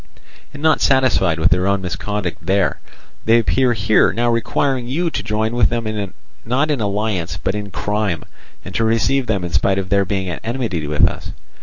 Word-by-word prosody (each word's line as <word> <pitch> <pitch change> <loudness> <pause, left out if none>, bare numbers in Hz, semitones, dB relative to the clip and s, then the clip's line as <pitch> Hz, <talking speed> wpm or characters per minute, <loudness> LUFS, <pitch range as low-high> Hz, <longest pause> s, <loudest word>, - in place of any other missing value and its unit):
And 145 - -10
not 155 -1 +3
satisfied 130 -11 +3
with 80 +2 +2
their 90 +1 +2
own 100 -1 +1
misconduct 95 0 -3
there, 95 -6 +1 0.5
they 115 +1 +5
appear 125 +2 +2
here 110 -1 +3
now 120 +3 +1
requiring 120 +2 0
you 165 +6 -1
to - - -2
join 110 +2 -1
with 120 - +3
them 110 -4 -3 0.3
not 135 +7 +1
in 140 -6 -1
alliance 100 -4 -1
but 95 - -2
in 105 -1 -4
crime, 105 -3 -2 0.4
and - - -8
to 115 - 0
receive 115 +4 +1
them 100 -4 0
in 85 - -4
spite 95 -1 +2
of 95 -1 -3
their 100 0 +3
being 95 -1 -2
at 85 -6 -5
enmity 115 - -2
with 75 0 +3
us. - - -6
105 Hz, 190 wpm, -19 LUFS, 95-120 Hz, 0.5 s, they